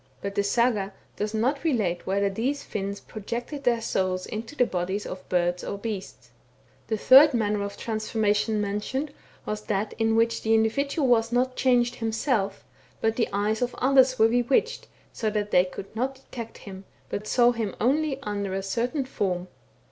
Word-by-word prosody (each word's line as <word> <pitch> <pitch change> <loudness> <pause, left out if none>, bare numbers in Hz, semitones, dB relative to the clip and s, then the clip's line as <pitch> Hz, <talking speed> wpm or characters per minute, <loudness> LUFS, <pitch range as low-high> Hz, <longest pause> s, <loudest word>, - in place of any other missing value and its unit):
But 200 0 -4
the 200 - +1
Saga 205 -2 +1 0.2
does 210 0 -2
not 265 +6 0
relate 210 - 0
whether 200 +1 +1
these 245 +9 -2
Finns 200 0 -4
projected 240 +7 -6
their 235 -2 +3
souls 185 -3 -1
into 225 +6 -6
the 250 - +4
bodies 190 +1 -2
of 185 0 -8
birds 175 0 +1
or 200 - -4
beasts. 200 -2 -6 0.6
The 220 - -1
third 270 +5 +7
manner 210 -2 +1
of 200 0 -5
transformation 215 -1 0
mentioned, 210 +8 -2 0.3
was 210 0 -3
that 205 0 -1
in 225 0 +2
which 230 +1 +2
the 225 0 +3
individual 280 +6 +1
was 230 -2 +3
not 255 +1 +1
changed 245 -2 +2
himself, 225 -3 -1 0.4
but 225 0 +1
the 235 - 0
eyes 210 +3 0
of 245 0 -1
others 260 -1 +4
were 220 - +6
bewitched, 245 - +1 0.3
so 220 - -1
that 210 -1 -2
they 180 - +5
could 190 +3 -9
not 260 +4 -1
detect 235 -3 -9
him, 195 -1 -10 0.2
but 210 +1 -4
saw 240 +1 +4
him 225 -4 -3
only 280 +4 +1
under 200 -2 -3
a 195 - -2
certain 245 +8 -1
form. 185 -7 -2
220 Hz, 170 wpm, -26 LUFS, 200-245 Hz, 0.6 s, third